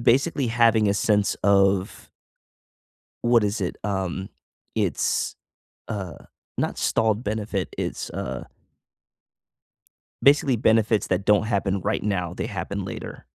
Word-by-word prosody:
basically, 135 +3 +2
having 115 -2 +4
a 100 - +2
sense 105 -1 +2
of 100 -1 +2 1.1
What 120 -2 +4
is 105 +1 -1
it? 90 - -2
Um, 95 -1 -2 0.5
it's - - 0 0.5
uh, 95 -5 -4 0.4
not - - -1
stalled 110 +1 +1
benefit. 105 -3 -3
It's, - - -3
uh 60 0 -5 1.8
basically 140 -2 +5
benefits 110 -1 +2
that 95 +1 -1
don't 105 0 +4
happen 100 -3 0
right 105 +4 -1
now, 90 -4 -1
they - - -3
happen - - -4
later. - - -7
105 Hz, 115 wpm, -24 LUFS, 95-115 Hz, 1.8 s, basically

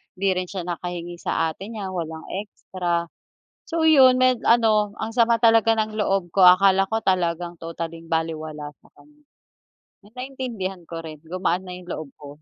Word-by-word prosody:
'di 195 0 +1
rin 185 - -2
siya 190 -3 -5
nakahingi 175 0 -5
sa 165 0 0
ate 195 +6 -10
niya, 200 -4 -5
walang 160 -3 -5 0.2
extra. 175 -4 -3 0.6
So 325 -1 0
'yon 265 -5 +7
med 255 -2 +3
ano, 215 -3 +3
ang 220 +1 -4
sama 235 -1 +3
talaga 225 -1 +5
ng 215 0 -1
loob 195 -4 0
ko. 195 - +2
Akala 190 +1 +6
ko 220 - 0
talagang 175 -2 0
totaling 165 0 -6
balewala 155 -2 -3
sa - - -22
kaniya, 295 0 -22 0.8
na - - -16
naintindihan 245 -8 -5
ko 165 -1 -6
rin 155 -2 -9
gumaan 180 +2 -1
na 180 - -6
'yong 180 0 -12
loob 155 -2 -6
ko. 145 -1 -12
185 Hz, 170 wpm, -23 LUFS, 170-220 Hz, 0.8 s, yon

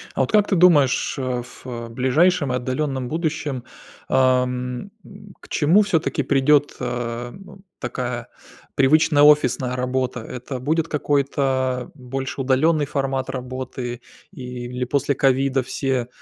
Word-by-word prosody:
А - - +1
вот - - 0
как 210 -1 +4
ты 195 - +1
думаешь, 165 -7 +4
а, 130 -2 -1
ф 120 - -14 0.3
ближайшем 140 +5 +2
и - - 0
отдалённом 130 +1 -2
будущем, 150 -5 -2 0.4
ам, 125 +4 +1
м, 200 0 -14
к - - -17
чему 165 +7 +4
всё-таки 165 -7 0
придёт, 140 +2 +3
а, 120 -1 -4
б 195 0 -13 0.2
такая 120 -1 -4 0.5
привычная 145 +2 +4
офисная 130 -4 +4
работа? 125 -1 -2
Это 125 +3 -7
будет 155 +5 0
какой-то 135 -3 0
больше 135 0 -5
удалённый 145 +4 +2
формат 135 -2 -2
работы 130 -1 -5 0.3
или 125 -5 -6
после 140 +2 0
ковида 135 0 +2
все, 130 -1 -2
130 Hz, 125 wpm, -22 LUFS, 125-150 Hz, 0.5 s, как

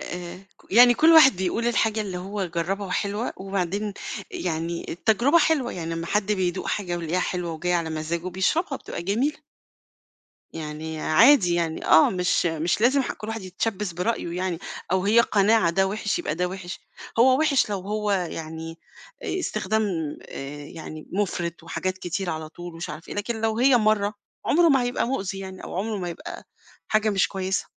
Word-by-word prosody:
آآ، 175 0 -6 0.2
ك - - -22
يعني 245 +2 +8
كلّ 320 +6 +5
واحد 285 - +8
بيقول 190 +6 -1
الحاجة 225 -2 +1
اللي 190 -4 -4
هو 195 +2 -3
جرّبها 180 +4 -2
وحلوة، 205 +5 -2
وبعدين 195 +2 -2 0.4
يعني 170 - -3
التجربة 230 - +3
حلوة 295 -6 +2
يعني 165 -2 -4
أمّا 165 0 -4
حد 210 +1 +1
بيدوق 185 -2 -1
حاجة 180 -4 -2
ويلاقيها 170 +1 -1
حلوة 180 -2 -2
وجايه 175 +3 -1
على 165 -2 0
مزاجه 160 +3 -3
بيشربها 250 - 0
بتبقى - - -6
جميلة. 235 - 0 1.1
يعني 155 0 -6
عادي، 195 - +5
يعني 165 -2 -1
آه، 160 - +6
مش 180 -1 +1
مش 165 +4 0
لازم 265 +4 +4
ح - - -2
كلّ 215 - -9
واحد 225 -1 -4
يتشبّث 190 +1 -3
برأيه، 180 -2 -2
يعني 180 -2 -2 0.3
أو 190 0 +2
هي 220 +3 +5
قناعة 215 -4 +4
ده 190 +3 +2
وحش، 205 +1 -1
يبقى 150 - -2
ده 180 +1 0
وحش، 180 -1 -7 0.4
هو 260 +2 +6
وحش 290 -7 +3
لو 200 -2 -2
هو 210 +2 -2
يعني 165 -3 -4 0.4
استخدام 220 - -1 0.5
آآ 145 +1 -7
يعني 155 0 -9
مُفرِط، 175 -4 -2
وحاجات 185 +3 -3
كتيرة 180 0 -3
على 155 -1 -5
طول، 175 +1 -9
ومش 165 +1 -6
عارف 155 +2 -8
إيه، - - -6
لكن 220 +2 -3
لو 220 0 0
هي 255 +1 +5
مرّة 215 -2 +2 0.3
عُمره 335 +2 +4
ما 270 -3 +4
هيبقى 245 -1 -1
مؤذي 195 -7 -2
يعني، 190 -1 -8
أو - - -7
عُمره 210 +2 -2
ما 175 -2 -3
يبقى 170 - -8 0.4
حاجة 215 0 +2
مش 195 -2 +2
كويسة، 190 0 -2
190 Hz, 175 wpm, -25 LUFS, 170-220 Hz, 1.1 s, يعني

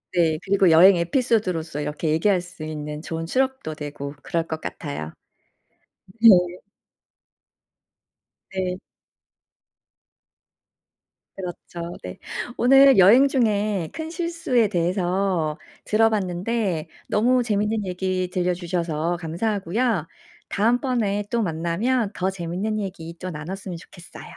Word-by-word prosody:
네. 160 -3 +2
그리고 195 -3 +3
여행 180 +4 +8
에피소드로서 170 - 0
이렇게 150 +2 -3
얘기할 180 +4 +2
수 175 -3 -10
있는 150 -1 -5
좋은 165 0 -4
추억도 260 -8 -1
되고 145 -1 -6
그럴 165 -1 -2
것 160 0 -4
같아요. 80 - -6 1.1
네. 230 - +9 2.2
네. 185 -1 -2 2.6
그렇죠 175 -2 -7
네. 90 - -7 0.4
오늘 270 0 +6
여행 225 +9 +7
중에 210 - 0
큰 320 0 -5
실수에 330 -9 0
대해서 180 -3 0 0.3
들어 225 +1 +4
봤는데 190 -3 -1 0.2
너무 245 +4 +2
재미있는 210 -1 0
얘기 185 0 -2
들려주셔서 175 -2 -1
감사하고요. 190 +2 -1 0.4
다음번에 225 -2 +1
또 235 - 0
만나면 195 +7 0
더 185 +1 -1
재미있는 190 +4 -3
얘기 175 -5 -6
또 185 - -5
나눴으면 180 +3 -6
좋겠어요. 175 +1 -13
185 Hz, 245 characters per minute, -23 LUFS, 165-215 Hz, 2.6 s, 네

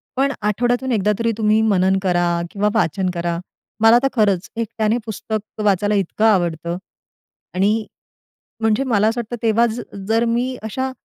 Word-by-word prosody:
पण 275 +2 +2
आठवड्यातून 245 +5 0
एकदा 210 -2 +2
तरी 230 0 +1
तुम्ही 215 0 +3
मनन 190 -3 +3
करा 175 -2 +2 0.3
किंवा 210 +1 +1
वाचन 190 -2 +1
करा. 170 -1 -2 0.4
मला 225 +1 +7
तर - - +4
खरंच 200 -6 +1
एकट्याने 225 0 -1
पुस्तक 215 0 -5
वाचायला 205 +1 +2
इतकं 200 +2 0
आवडतं 170 -5 +1 0.8
आणि 195 +2 +3 0.9
म्हणजे 225 +3 +1
मला 220 -5 +2
असं 230 +2 -1
वाटतं, 235 +1 -5
तेव्हा 230 +1 +3 0.4
जर 225 +1 +2
मी 245 +2 0
अशा 260 +5 -3
215 Hz, 145 wpm, -20 LUFS, 195-230 Hz, 0.9 s, मला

